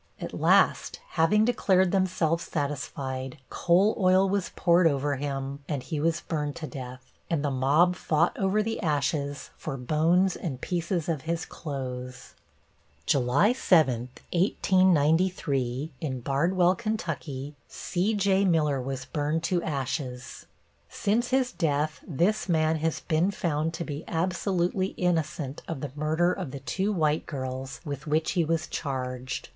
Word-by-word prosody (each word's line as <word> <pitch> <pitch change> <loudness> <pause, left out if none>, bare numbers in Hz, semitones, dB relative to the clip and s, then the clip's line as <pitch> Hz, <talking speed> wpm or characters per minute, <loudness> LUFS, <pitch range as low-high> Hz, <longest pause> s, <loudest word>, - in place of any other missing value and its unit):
At - - -6
last, - - +3
having 195 +6 +3
declared 190 -6 +3
themselves 170 -3 +1
satisfied, 135 -3 -3
coal 185 +5 +3
oil 185 0 +4
was 195 -1 -1
poured 170 -1 +4
over 140 -1 0
him 140 0 -4
and 140 -5 -2
he 155 0 -3
was 165 +2 +1
burned 150 -3 -3
to 160 - -5
death, 130 -3 -9 0.2
and 150 -3 0
the 145 - 0
mob 145 +7 +3
fought 165 -1 +1
over 195 +2 +1
the 225 +1 -3
ashes 145 -3 -1
for 140 -3 -5
bones 165 +8 +2
and 140 -8 -5
pieces 170 +1 -2
of 160 -5 -1
his 170 0 -1
clothes. 125 -4 -6 0.7
July 140 - +3
7, 135 - +3 0.2
1893, 165 -6 +2
in 130 -5 -3
Bardwell, 175 +8 +2
Ky., 165 - -4
C.J. 200 +1 +1
Miller 150 -6 +2
was 135 0 -4
burned 150 +3 -1
to 175 +1 +1
ashes. 135 -4 -4 0.4
Since 230 +4 0
his 260 -1 +2
death 155 -2 0
this 185 +6 0
man 160 -1 +2
has 160 +1 -1
been 165 +4 +1
found 165 -4 -1
to 170 - -3
be 150 0 -5
absolutely 185 +2 0
innocent 155 -5 -1
of 165 -4 -4
the 145 - -4
murder 160 +4 +1
of - - -5
the 140 - -7
two 185 - -1
white 155 -5 +1
girls 130 -2 -5
with 145 +1 -5
which 155 +1 +1
he 175 -3 +2
was 160 0 0
charged. 130 -4 -4
160 Hz, 140 wpm, -27 LUFS, 140-180 Hz, 0.7 s, oil